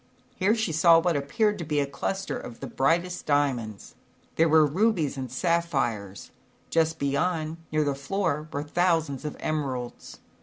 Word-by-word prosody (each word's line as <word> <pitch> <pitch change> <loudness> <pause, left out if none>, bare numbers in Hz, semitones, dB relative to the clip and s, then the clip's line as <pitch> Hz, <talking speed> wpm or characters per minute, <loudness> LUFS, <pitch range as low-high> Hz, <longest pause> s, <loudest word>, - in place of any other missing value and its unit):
Here 205 +4 +2
she 220 -6 -1
saw 165 +1 +6
what 170 0 +2
appeared 205 +9 0
to - - -3
be 150 -2 0
a 140 - +2
cluster 190 +8 -3
of 115 - -8
the - - -6
brightest 170 +6 0
diamonds. 130 -8 -1 0.4
There 165 0 +3
were 155 0 +6
rubies 170 -1 +1
and 130 -3 -5
sapphires; 130 - -1 0.4
just 160 0 +2
beyond, 155 +3 -1
near 155 0 +2
the 145 -1 0
floor, 155 +1 -2
were 145 - -3
thousands 160 -3 0
of 150 - -5
emeralds. 135 -6 -4
155 Hz, 155 wpm, -26 LUFS, 140-170 Hz, 0.4 s, saw